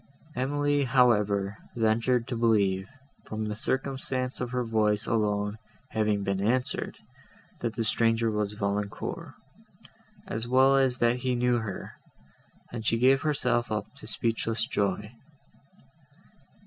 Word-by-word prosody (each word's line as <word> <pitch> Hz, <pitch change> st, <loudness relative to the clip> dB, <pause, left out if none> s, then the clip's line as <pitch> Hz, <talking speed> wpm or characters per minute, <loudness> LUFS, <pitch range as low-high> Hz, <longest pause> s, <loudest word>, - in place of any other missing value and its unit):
Emily, 145 Hz, +2 st, +1 dB
however, 105 Hz, -6 st, +2 dB, 0.2 s
ventured 115 Hz, +2 st, +2 dB
to 125 Hz, -, -3 dB
believe, 100 Hz, -5 st, +2 dB, 0.4 s
from 110 Hz, 0 st, -3 dB
the 105 Hz, -, -2 dB
circumstance 130 Hz, +2 st, -2 dB
of 125 Hz, -, -2 dB
her 125 Hz, 0 st, -1 dB
voice 110 Hz, -2 st, +1 dB
alone 105 Hz, -1 st, 0 dB, 0.3 s
having 105 Hz, -2 st, +1 dB
been 100 Hz, 0 st, -1 dB
answered, 125 Hz, +5 st, 0 dB, 0.6 s
that 115 Hz, -2 st, -3 dB
the 115 Hz, -, -1 dB
stranger 115 Hz, +1 st, +2 dB
was 105 Hz, -1 st, -1 dB
Valancourt, 100 Hz, -1 st, -3 dB, 0.9 s
as 115 Hz, +2 st, -4 dB
well 130 Hz, +2 st, +5 dB
as 130 Hz, -2 st, +3 dB
that 120 Hz, -1 st, +2 dB
he 125 Hz, 0 st, -1 dB
knew 125 Hz, 0 st, +2 dB
her, 110 Hz, -5 st, -5 dB, 0.8 s
and 115 Hz, -2 st, -5 dB
she 115 Hz, +1 st, +2 dB
gave 130 Hz, +3 st, +4 dB
herself 125 Hz, -6 st, 0 dB
up 105 Hz, +1 st, -3 dB
to -, -, -10 dB
speechless 115 Hz, -1 st, -1 dB
joy. 105 Hz, -3 st, -1 dB
115 Hz, 125 wpm, -28 LUFS, 105-125 Hz, 0.9 s, well